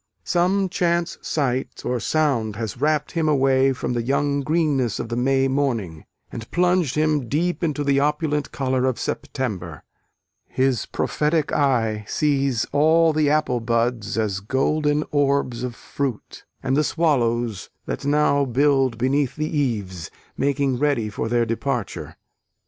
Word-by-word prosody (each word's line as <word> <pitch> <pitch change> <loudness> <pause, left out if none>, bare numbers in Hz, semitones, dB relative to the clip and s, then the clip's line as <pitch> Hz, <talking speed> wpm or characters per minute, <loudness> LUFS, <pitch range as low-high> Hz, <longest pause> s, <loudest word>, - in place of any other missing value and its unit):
Some 190 +2 +1
chance 170 -1 0
sight 135 -4 -2
or 125 -1 0
sound 120 -6 0
has 115 +2 -5
wrapt 150 0 +1
him 165 -3 0
away 135 -2 +3
from 130 -1 -3
the 120 - 0
young 140 +3 0
greenness 145 -6 +1
of 115 - -4
the 120 - -2
May 135 +2 +2
morning, 120 - -2 0.3
and 115 -1 -8
plunged 180 -5 +1
him 150 -5 +1
deep 175 +5 -1
into 150 -3 0
the 140 -1 +2
opulent 150 0 0
colour 130 -1 0
of 130 -2 0
September. 95 - -4 0.6
His 130 -3 0
prophetic 150 0 0
eye 115 -7 +1
sees 140 -5 +1
all 160 +3 +4
the 150 -1 +2
apple 150 -5 +1
buds 115 -1 -1
as 105 -3 0
golden 145 +7 0
orbs 140 -4 +1
of 125 -2 -4
fruit, 135 -4 -5 0.2
and 135 0 +1
the 150 - +3
swallows, 120 - 0 0.2
that - - -4
now 145 0 +2
build 135 -1 +2
beneath 130 +2 0
the 155 +1 -3
eaves, 100 - -2 0.3
making 140 -2 0
ready 140 -7 +1
for 110 - -3
their 120 0 +2
departure. 115 0 -3
135 Hz, 145 wpm, -22 LUFS, 120-150 Hz, 0.6 s, all